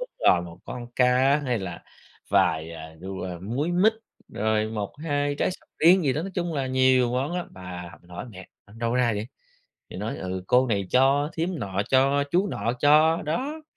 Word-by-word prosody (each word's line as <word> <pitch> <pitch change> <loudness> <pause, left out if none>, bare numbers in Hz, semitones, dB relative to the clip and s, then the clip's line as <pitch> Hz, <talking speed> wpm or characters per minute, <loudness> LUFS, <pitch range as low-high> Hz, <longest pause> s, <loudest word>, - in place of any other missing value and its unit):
đúng - - -5 0.2
rồi 90 -1 +5
một 85 0 -10
con 120 -1 -7
cá, 130 +3 +4
hay 125 -4 0
là 90 -3 -6 0.5
vài, 80 0 +2
ờ, 80 -1 -9
đu, 95 +1 -6
à 90 -2 -5
múi 135 - -2
mít, 200 +5 +4 0.4
rồi 110 0 0
1-2 145 +7 -2
trái - - +1
sầu 185 - -10
riêng 180 +3 +6
gì 135 - +2
đó, 155 - -2
nói 195 - -5
chung 175 -2 -2
là 135 -2 -1
nhiều 130 -1 +3
món 135 +6 -1
lắm. 180 - -4
Và 90 -2 -8
mình 90 - -23
hỏi 90 - -6
mẹ: 95 -3 -11 0.2
"Ở 100 - -19
đâu 115 +1 -1
ra 125 -2 +2
vậy?", 105 +1 -3 0.6
thì - - -8
nói: - - -4
"Ừ, 95 0 -4
cô 125 +1 +4
này 100 -5 -1
cho, 140 +3 +3
thím 170 +1 -2
nọ 100 -2 -2
cho, 135 +2 +3
chú 185 +5 +2
nọ 115 - -1
cho." 155 +3 +5
đó. 275 - -3
125 Hz, 205 wpm, -25 LUFS, 95-150 Hz, 0.6 s, riêng